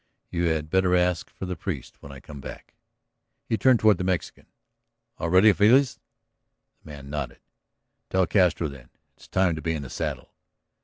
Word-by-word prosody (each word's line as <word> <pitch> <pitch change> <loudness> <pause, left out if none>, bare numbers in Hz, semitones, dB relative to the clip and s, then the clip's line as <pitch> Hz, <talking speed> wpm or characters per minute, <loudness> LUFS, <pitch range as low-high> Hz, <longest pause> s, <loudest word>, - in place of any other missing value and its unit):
You 85 0 0
had 80 -2 -1
better 95 -1 +3
ask 90 -1 +1
for - - -8
the 90 0 -4
priest 80 -5 -6
when 70 - -10
I 70 - -10
come 70 0 -11
back." - - -10 0.7
He - - 0
turned 125 +1 +4
toward 105 -4 +4
the - - -1
Mexican. 90 -3 -3 0.7
"All 85 - -2
ready, 95 +4 +6
Feliz?" 125 +7 +4 0.8
The - - -14
man 70 -2 -10
nodded. 75 -4 -4 0.7
"Tell 95 -1 +2
Castro, 85 -3 +2
then. 70 -4 -11 0.3
It's - - -18
time 95 -2 +2
to 80 - -6
be 80 0 -1
in 75 - -5
the 65 - -9
saddle." - - -4
85 Hz, 175 wpm, -25 LUFS, 75-95 Hz, 0.8 s, ready